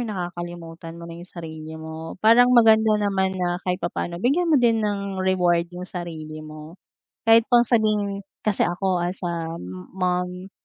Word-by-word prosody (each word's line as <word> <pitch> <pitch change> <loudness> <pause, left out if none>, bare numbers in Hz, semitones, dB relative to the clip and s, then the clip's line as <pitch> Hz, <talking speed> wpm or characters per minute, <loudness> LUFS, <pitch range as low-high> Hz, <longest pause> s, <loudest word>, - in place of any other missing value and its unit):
nakakalimutan 175 -5 -6
mo 170 - -9
na 170 - -8
yung 175 - -9
sarili 160 -2 -8
mo. 160 +1 -8
Parang 240 +3 +7
maganda 220 -2 +6
naman 190 -2 0
na 180 0 -1
kahit 180 0 -1
papaano 170 0 -3
bigyan 285 - +1
mo 310 - +5
din 230 -3 +3
ng 200 -2 -2
reward 175 -2 +2
yung 180 +1 -8
sarili 160 -4 -6
mo. 155 +3 -11 0.4
Kahit 225 0 +5
pang 240 -1 +5
sabihin 215 -4 +1 0.2
kasi 215 -2 +2
ako 180 +1 0
as 180 +2 -2
a 165 -1 -3 0.4
mom, 180 +1 -2
180 Hz, 160 wpm, -23 LUFS, 170-210 Hz, 0.4 s, Parang